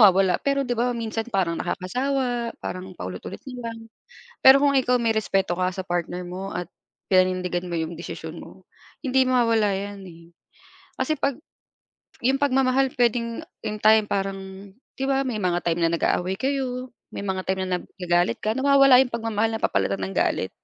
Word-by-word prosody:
nawawala, 190 -3 +5
pero 275 0 +1
'di 245 - -2
ba, 240 +2 +1
minsan 225 0 -3
parang 185 -7 0
nakakasawa, 245 +4 -2
parang 185 +1 -6
paulit-ulit 90 0 -6
na 245 -2 -5
lang. 230 - -8 0.6
Pero 270 +2 +8
kung 285 -1 +4
ikaw 255 -2 +3
may 230 -2 +1
respeto 195 -4 0
ka 185 0 +2
sa 190 - -4
partner 175 0 -3
mo 185 +2 -6
at 180 0 -4 0.4
pinanindigan 185 -1 +2
mo 175 - -3
'yong 160 0 -2
desisyon 170 - -7
mo, - - -13 0.4
hindi 265 -1 +2
mawawala 230 -5 +3
'yan, 200 0 -6
eh, 170 -1 -13 0.8
kasi 310 - +1
'pag 275 -2 -1 0.8
'yung 265 +3 +2
pagmamahal 270 -1 +2
puwedeng 235 -1 0 0.2
'yung 210 0 -4
time, 215 0 +6
parang 195 0 -4 0.3
'di 265 - -4
ba, 270 0 +1
may 230 -5 -2
mga 180 -2 +1
time 170 0 0
na 165 - +3
nag-aaway 180 +2 0
kayo, 255 -1 -2 0.2
may 200 - -6
mga 190 -1 -1
time 190 0 0
na 180 -1 -1
nag - - -15
nagalit 175 -1 +1
ka, 215 - 0
nawawala 275 0 +6
'yung 255 -2 -1
pagmamahal, 225 -1 -1
napapalitan 100 - 0
ng 95 - -6
galit. - - +1
215 Hz, 170 wpm, -24 LUFS, 185-250 Hz, 0.8 s, Pero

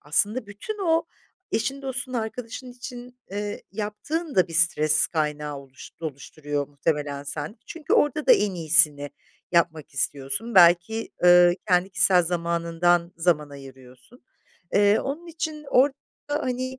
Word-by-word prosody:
aslında 205 - +1
bütün 205 - -7
o 325 0 +2 0.5
eşin, 275 +5 -2
dostun, 265 0 -4
arkadaşın 235 +2 -5
için, 245 0 -10
eee, 205 +1 -5
yaptığın 240 - -4
da 185 -1 +3
bir 165 - -9
stres 155 -2 +4
kaynağı 150 -2 -3
oluş 135 -2 -13
oluşturuyor 145 -1 -5
muhtemelen 145 0 -3
sende. 175 +10 -5
Çünkü 330 -3 -6
orada 295 +1 +2
da - - +8
en 210 - +2
iyisini 155 -4 +3 0.4
yapmak 160 -4 0
istiyorsun. 140 - -1
Belki, 175 +5 +4
ııı, 175 0 +7 0.2
kendi 180 +1 +2
kişisel 185 -1 +5
zamanından 170 0 0
zaman 165 -4 0
ayırıyorsun. 135 - -15 0.5
Eee, 205 +1 +4
onun 295 +6 -5
için 315 -2 -5
orada, 270 +2 +4 0.3
hani, 255 -3 -3
180 Hz, 130 wpm, -24 LUFS, 155-250 Hz, 0.5 s, da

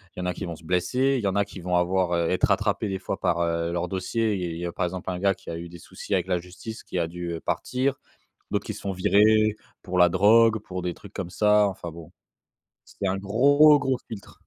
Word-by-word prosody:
il - - -5
en - - -3
a 90 - -1
qui - - -6
vont 85 -2 -5
se 80 - -17
blesser, 110 +11 +1
il - - -6
y 100 - +1
en 95 - -1
a 100 0 +2
qui 95 - -11
vont 90 0 -2
avoir 90 0 +1
heu, 85 -1 0
être 90 - +3
rattrapés 105 +1 0
des 95 - -2
fois 95 - -5
par, 85 - 0
heu, 85 0 -1
leurs 85 +1 -2
dossiers. 105 +4 -1
Il 95 - -4
y - - -1
il - - -6
y 85 - -4
a 85 - -3
par 90 - -1
exemple 90 +1 -4
un 90 - -4
gars 100 0 +2
qui - - -10
a 85 - -4
eu 85 +1 -8
des 85 - -11
soucis 100 - -5
avec 90 - 0
la 90 -1 +1
justice 90 +6 -9
qui - - -6
a 85 - +1
dû, 85 0 -5
heu, 80 - -4
partir, 130 +9 -1 0.5
d'autres - - -2
qui - - -4
se - - -10
font 100 -1 -3
virer 110 +3 +4 0.3
pour 90 -2 -2
la 90 0 +7
drogue, 110 +4 +5
pour 90 -2 -5
des 90 -1 -3
trucs 100 0 -14
comme 95 -4 -5
ça 105 +2 +3
enfin 90 -3 -6
bon. 85 +1 -12 0.8
C'est 100 - -4
un 95 +1 0
gros, 140 +9 +5
gros 135 -2 0
filtre. 100 -4 -9
95 Hz, 270 wpm, -25 LUFS, 90-105 Hz, 0.8 s, la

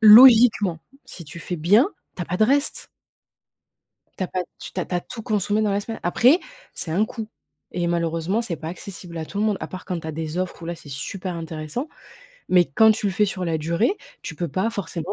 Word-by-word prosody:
logiquement 220 -5 +8 0.3
si 170 - -9
tu 150 +4 -10
fais 180 - -4
bien, 205 - +4 0.3
tu 180 - -3
as - - -3
pas 180 - -2
de 215 - +2
restes 280 +4 +1 1.3
tu 185 - 0
as - - -5
pas 185 - -2 0.2
tu - - -8
tu 185 - -2
as - - -1
pas 180 -1 -1
tout 225 +5 -9
consommé 210 -1 0
dans 210 - +1
la 200 +1 +1
semaine. 225 +2 -6
Après, 250 - +4 0.3
c'est 160 - -2
un 195 +7 +2
coût 225 -1 -6 0.4
et 175 -1 -1
malheureusement 170 +5 0
c'est 175 -8 -1
pas 160 +1 -8
accessible 180 -1 -8
à 160 - -3
tout 200 - -6
le 215 - +2
monde 210 -2 +2
à - - -5
part 185 - -8
quand 180 -3 -3
tu 160 - -9
as - - -2
des 160 +2 -4
offres 185 -1 -3
où - - -6
là, 170 - -3
c'est 150 - -14
super 175 +6 -5
intéressant, 165 - -5 0.6
mais 180 -2 +5
quand 220 +11 +5
tu 210 -1 -2
le 195 - 0
fais 210 +3 +3
sur 190 -3 -3
la 165 -1 +1
durée, 170 - +1 0.3
tu 160 - -6
peux 170 +1 -3
pas 185 +10 0
forcément 185 -3 -4
185 Hz, 235 wpm, -23 LUFS, 170-215 Hz, 1.3 s, logiquement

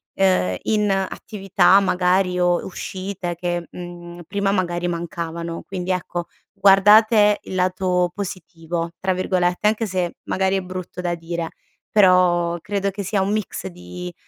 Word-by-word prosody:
uhm, 185 - +2
in 210 -1 +1
attività 195 -1 +2
magari 180 -1 +1
o 175 -1 +2
uscite 190 -1 -5
che, 175 0 -3
mhmm, 175 0 -9
prima 200 0 0
magari 175 -2 -1
mancavano. 170 0 -4
Quindi 185 -1 -4
ecco, 175 -1 -3 0.3
guardate 210 +2 +6
il - - -7
lato 180 -1 +1
"positivo" 170 -3 -5
tra 190 0 0
virgolette, 180 0 0
anche 220 +1 +1
se 180 -2 -2
magari 190 0 +1
è - - -1
brutto 185 0 -7
da 175 -1 -1
dire, 165 0 -4 0.4
però 180 -3 +4
credo 200 +1 -2
che 200 +1 -6
sia 195 +1 0
un 195 +1 0
mix 215 - -3
di 90 0 -8
180 Hz, 140 wpm, -21 LUFS, 175-195 Hz, 0.4 s, guardate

